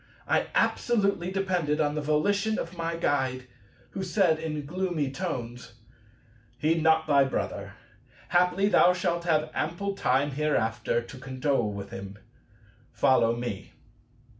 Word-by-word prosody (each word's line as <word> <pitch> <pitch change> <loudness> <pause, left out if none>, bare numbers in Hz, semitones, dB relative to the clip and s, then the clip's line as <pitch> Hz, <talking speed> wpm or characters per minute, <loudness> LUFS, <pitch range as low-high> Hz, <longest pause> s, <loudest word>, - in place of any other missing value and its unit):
I - - +2
absolutely 200 -6 +1
depended 180 -6 0
on 145 -1 +1
the 150 - -2
volition 200 +9 +1
of 170 +2 -5
my 165 0 -3
Guide, 130 -6 -1 0.5
who 195 - -5
said 180 -4 +2
in 150 -2 -4
gloomy 170 -3 -2
tones, 125 -8 -5 0.8
"Heed 160 +4 +1
not 160 0 +4
thy 140 -2 +4
brother; 135 - -3 0.5
haply 180 +2 +3
thou 180 -3 +5
shalt 170 -1 -1
have 155 -2 +1
ample 175 +6 -2
time 140 -5 +1
hereafter 120 -5 0
to 125 +3 -11
condole 130 -3 -1
with 100 -1 -7
him. 100 +1 -8 0.7
Follow 115 -3 +3
me." 120 -5 -5
155 Hz, 130 wpm, -27 LUFS, 130-180 Hz, 0.8 s, thou